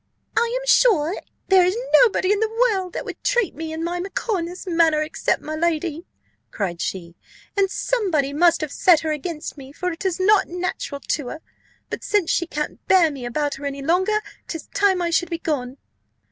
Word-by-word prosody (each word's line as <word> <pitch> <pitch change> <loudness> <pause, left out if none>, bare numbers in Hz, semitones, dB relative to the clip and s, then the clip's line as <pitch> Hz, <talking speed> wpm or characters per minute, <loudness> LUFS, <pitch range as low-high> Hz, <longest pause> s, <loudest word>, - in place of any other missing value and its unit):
"I 470 +2 +1
am - - -8
sure 390 -10 +4 0.3
there 380 -1 +6
is 365 +4 +1 0.2
nobody 405 -5 +3
in 410 - +2
the 445 0 +1
world 435 -6 +1
that - - -4
would - - -8
treat 485 -7 +1
me 320 0 -6
and 320 +1 -4
my 350 +1 -2
macaw 390 +3 -2
in 335 - -2
this 355 +2 -8
manner, 330 -3 +3
except 310 - -1
my 310 - -4
lady," 330 0 -1 0.4
cried 175 -5 -3
she; 170 -3 -4 0.4
"and 395 -1 +2
somebody 360 - 0
must 335 +3 +4
have 310 -2 -3
set 335 0 +4
her 315 - -2
against 305 0 -5
me, 265 0 -11
for 360 +5 -3
it 330 - -7
is 375 -2 -1
not 405 +2 +4
natural 350 -5 -4
to 290 -4 -2
her: 315 - -7 0.5
but - - -4
since 410 -5 +1
she 345 - +1
can't 300 -2 -4
bear 350 -4 +5
me 260 -4 -6
about 290 +4 -1
her 285 - -8
any 280 0 -5
longer, 375 +7 +2 0.3
'tis 325 -3 -6
time 385 -3 +2
I 340 - 0
should 345 +1 +1
be 335 - -2
gone." 275 -6 -3
340 Hz, 200 wpm, -22 LUFS, 300-385 Hz, 0.5 s, there